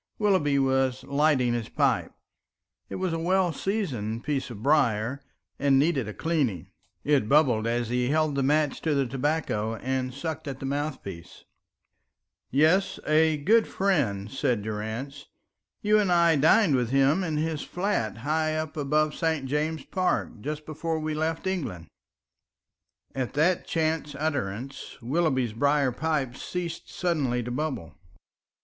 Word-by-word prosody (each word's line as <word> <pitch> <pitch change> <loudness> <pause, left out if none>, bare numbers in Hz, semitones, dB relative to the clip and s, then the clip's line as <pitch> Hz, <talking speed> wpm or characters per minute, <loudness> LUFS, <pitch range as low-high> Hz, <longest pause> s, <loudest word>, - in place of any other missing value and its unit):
Willoughby 185 -10 +2
was 130 -1 +1
lighting 140 -4 +2
his 120 -2 -3
pipe. - - +1 0.8
It - - -5
was 185 -2 -1
a 165 - -1
well 180 0 +2
seasoned 130 - -2
piece 140 -3 -2
of 110 -3 -9
briar, 130 -3 +2 0.4
and 140 -1 +4
needed 140 -5 +2
a 105 - -5
cleaning; 145 - -1 0.3
it 140 -7 +2
bubbled 125 -7 +4
as 120 0 -1
he 125 +1 0
held 155 0 +2
the 140 - 0
match 150 +1 +1
to 155 -3 0
the 140 -1 +2
tobacco 130 -4 -1
and 130 +2 -2
sucked 150 +4 -5
at 135 -2 -5
the - - -5
mouthpiece. 135 - -5 1.1
"Yes, 185 +8 +3
a 155 0 +3
great 220 +10 +3
friend," 125 - 0
said 125 -6 0
Durrance. 110 +7 -5 0.6
"You 215 +1 +4
and 200 -3 +1
I 170 -2 +5
dined 160 +4 +4
with 125 -3 0
him 135 +7 +3
in 160 -4 -2
his 155 -1 -1
flat 180 - -2
high 155 +1 +1
up 155 -1 -3
above 150 +1 +1
St. 160 -4 -1
James's 150 +2 -2
Park 185 -1 0
just 150 +3 -5
before 160 +1 -3
we 155 0 -2
left 160 +3 -2
England." 135 - -3 1.3
And 130 -2 -1
at - - -19
that 170 +5 +2
chance 155 -2 -1
utterance 135 -3 -4
Willoughby's 130 -3 0
briar 140 +2 +2
pipe 140 -2 -1
ceased 175 -2 -5
suddenly 140 -9 -1
to 120 - -5
bubble. 125 - -4
145 Hz, 145 wpm, -27 LUFS, 125-160 Hz, 1.3 s, I